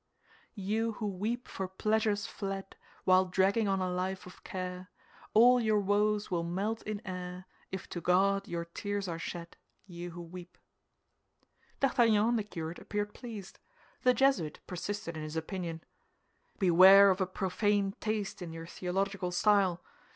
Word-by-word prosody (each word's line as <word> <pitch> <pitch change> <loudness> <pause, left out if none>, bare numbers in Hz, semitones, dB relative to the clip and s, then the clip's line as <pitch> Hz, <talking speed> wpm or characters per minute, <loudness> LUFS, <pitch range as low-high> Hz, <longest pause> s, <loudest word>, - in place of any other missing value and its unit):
"You 220 +4 -1
who 215 - -5
weep 210 +5 -2
for 190 - -4
pleasures 215 +2 0
fled, 195 -1 -5 0.3
While 185 0 +5
dragging 195 +4 +2
on 195 -1 +1
a 185 - 0
life 185 +1 -2
of 180 - -13
care, 185 0 -5 0.5
All 245 +3 +7
your 215 -2 +3
woes 205 +1 +1
will 175 -2 +1
melt 195 +7 -2
in 215 +1 -5
air, 180 -1 -6 0.3
If 190 - -5
to 175 - -5
God 195 +3 +2
your 170 0 -3
tears 200 +3 -4
are 165 -1 -4
shed, 170 0 -6 0.3
You 175 -2 -7
who 175 0 -8
weep!" 180 +1 -11 1.2
D'Artagnan 230 -5 +4
and 240 -1 +2
the - - -1
curate 165 -4 -6
appeared 205 0 -3
pleased. 215 -6 -9 0.4
The 250 0 +4
Jesuit 225 - +2
persisted 180 -1 -4
in 155 - -5
his 155 +1 -6
opinion. 165 0 -4 0.7
"Beware 190 +1 +8
of 190 +1 -1
a 185 - +1
profane 195 +1 0
taste 210 -3 -2
in 170 -2 -5
your 165 0 -7
theological 185 +1 -2
style. 190 -2 +3
195 Hz, 150 wpm, -31 LUFS, 180-210 Hz, 1.2 s, Beware